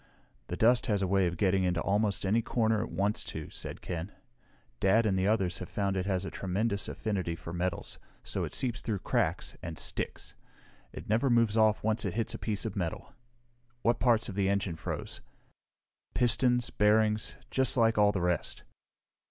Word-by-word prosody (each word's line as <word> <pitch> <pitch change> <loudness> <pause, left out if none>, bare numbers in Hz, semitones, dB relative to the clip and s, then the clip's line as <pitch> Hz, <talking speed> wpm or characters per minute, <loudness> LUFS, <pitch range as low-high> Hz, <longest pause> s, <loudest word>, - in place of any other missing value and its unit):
"The 90 - -4
dust 120 +2 +4
has 105 -4 +1
a - - +1
way 95 -1 +3
of 85 0 -3
getting 95 -2 +2
into 90 -2 +1
almost 100 +3 +1
any 110 +5 +3
corner 110 -2 +1
it - - -4
wants 100 +2 0
to," - - -6
said - - -6
Ken. 90 +2 -5 0.7
"Dad 110 +4 +4
and 100 -3 +2
the 95 +1 +1
others 100 -5 +1
have - - -7
found 100 -1 -1
it 95 0 -1
has 95 -1 0
a - - -5
tremendous 100 +2 -1
affinity 95 -6 -2
for 85 0 -8
metals, 90 +1 -3 0.2
so - - -3
it - - -4
seeps 120 -3 -1
through 110 -3 -2
cracks - - -1
and 80 -2 -6
sticks. - - -3 0.6
It - - -9
never 115 +6 +2
moves 115 -3 +3
off 110 -1 +3
once 110 +1 0
it 100 -3 -3
hits 115 -1 -1
a - - -6
piece 105 0 -2
of 110 - -4
metal. 85 -5 -4 0.7
What 120 0 +2
parts 120 -3 +3
of 105 - -5
the 100 0 +1
engine 100 -3 0
froze?" - - -5 0.9
"Pistons, 125 0 +2
bearings 105 0 +2 0.2
just 130 0 +3
like 115 -2 +3
all 105 0 +5
the 95 - -2
rest." 90 -2 -1
105 Hz, 185 wpm, -30 LUFS, 95-110 Hz, 0.9 s, all